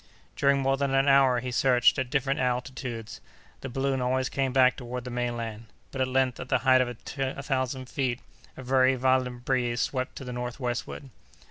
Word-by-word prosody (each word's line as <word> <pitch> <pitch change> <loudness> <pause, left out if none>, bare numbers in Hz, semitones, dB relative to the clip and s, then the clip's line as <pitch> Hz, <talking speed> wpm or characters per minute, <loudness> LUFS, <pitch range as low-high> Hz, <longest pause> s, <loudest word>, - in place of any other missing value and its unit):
During 140 0 +3
more 135 0 +2
than 135 -1 0
an 135 +1 +3
hour 135 -3 +5
he 125 0 -4
searched 125 +1 +3
at 130 -2 -2
different 135 +1 0
altitudes: 125 -2 -3 0.4
the 135 - -6
balloon 135 +1 -1
always 130 +1 0
came 135 -1 -1
back 130 -1 +4
toward 125 0 -6
the 125 - -7
mainland. 115 -2 -4 0.2
But 130 - -4
at 130 - +2
length, 130 -1 +1
at - - -7
the 130 - +3
height 130 -1 +6
of 125 - +1
a 130 +3 -5
thousand 130 -1 -2
feet, 125 -2 -2 0.4
a 130 - -8
very 130 +1 +3
violent 125 -1 0
breeze 120 -2 0
swept 130 -1 -2
to - - -7
the 125 -1 -6
northwestward. 125 +2 -4
130 Hz, 190 wpm, -27 LUFS, 125-135 Hz, 0.4 s, height